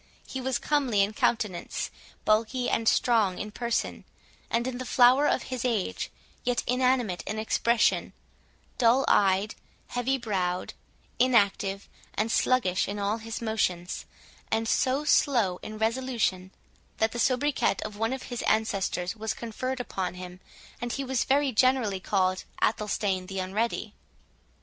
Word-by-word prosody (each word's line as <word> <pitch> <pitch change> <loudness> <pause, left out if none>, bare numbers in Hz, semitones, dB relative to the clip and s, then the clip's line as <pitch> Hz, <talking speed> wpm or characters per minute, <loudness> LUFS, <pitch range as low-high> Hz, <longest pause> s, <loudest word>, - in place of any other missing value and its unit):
He 265 - -5
was 260 -1 0
comely 265 -9 +2
in 205 +2 -2
countenance, 210 -5 -1 0.3
bulky 225 +4 +2
and 225 - 0
strong 215 -7 +2
in 210 - -5
person, 235 +2 -2 0.5
and 235 +1 0
in 255 -1 -3
the - - -3
flower 255 +4 +5
of - - +1
his 250 - -3
age—yet 240 +2 -2
inanimate 250 -6 +1
in 215 - -3
expression, 230 +2 +2 0.7
dull 245 +3 +4
eyed, 195 +1 +3 0.4
heavy 245 +2 0
browed, 185 -6 -2 0.5
inactive 200 -5 +2 0.3
and 220 +2 0
sluggish 215 -10 +2
in 205 - -4
all 205 +2 0
his 225 +1 -6
motions, 185 -5 -1 0.4
and 225 0 0
so 265 +6 +1
slow 235 - +3
in 215 0 -7
resolution, 220 -5 0 0.5
that 220 0 +2
the 240 - -5
soubriquet 265 -1 +2
of 215 -1 -6
one 225 +2 -1
of 265 0 -4
his 245 -1 -5
ancestors 195 -4 0
was 220 0 -3
conferred 255 +3 -4
upon 190 -7 -3
him, 180 0 -9 0.4
and 240 -1 -2
he 275 - -2
was 265 -2 0
very 275 0 +2
generally 245 -5 +2
called 185 -1 0 0.2
Athelstane 200 -3 0
the 195 - -6
Unready. 210 +3 -2
225 Hz, 140 wpm, -27 LUFS, 200-250 Hz, 0.7 s, flower